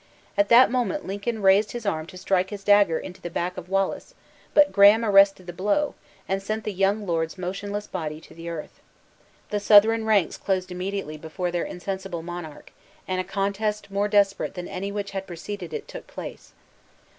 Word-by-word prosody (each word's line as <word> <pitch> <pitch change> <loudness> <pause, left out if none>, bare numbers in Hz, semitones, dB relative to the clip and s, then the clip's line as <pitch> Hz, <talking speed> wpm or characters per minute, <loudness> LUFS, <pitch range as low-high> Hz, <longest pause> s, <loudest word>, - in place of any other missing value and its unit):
At 200 0 +2
that 240 +1 +7
moment 255 +4 -1
Lincoln 205 +3 -3
raised 195 +2 +4
his 240 -2 -6
arm 160 -5 -1
to 185 - -11
strike 185 0 +1
his 205 -2 -7
dagger 205 -5 +5
into 180 +2 -8
the 175 - -5
back 175 +2 -2
of 180 -1 -8
Wallace; 195 - -1 0.4
but 295 -1 +6
Graham 205 +3 +6
arrested 195 -2 +5
the 175 - -7
blow, 210 - 0 0.3
and 195 0 -1
sent 215 +2 -3
the 210 - -3
young 195 +3 +1
lord's 165 -1 -1
motionless 200 +3 -4
body 155 -6 -5
to - - -15
the 170 0 -8
earth. 165 -2 -7 0.7
The 210 - 0
Southron 220 +2 +6
ranks 210 -5 +2
closed 185 -1 -2
immediately 180 -3 -4
before 170 +3 -4
their 175 0 -1
insensible 190 -2 -5
monarch; 175 -3 -8 0.4
and 185 0 0
a - - -5
contest 200 +1 -2
more 200 +1 +1
desperate 200 -2 +2
than 180 -1 -5
any 195 +1 -4
which 200 -1 -4
had 195 -1 -5
preceded 175 0 -7
it, - - -5
took - - -9
place. - - -9
195 Hz, 185 wpm, -25 LUFS, 180-205 Hz, 0.7 s, that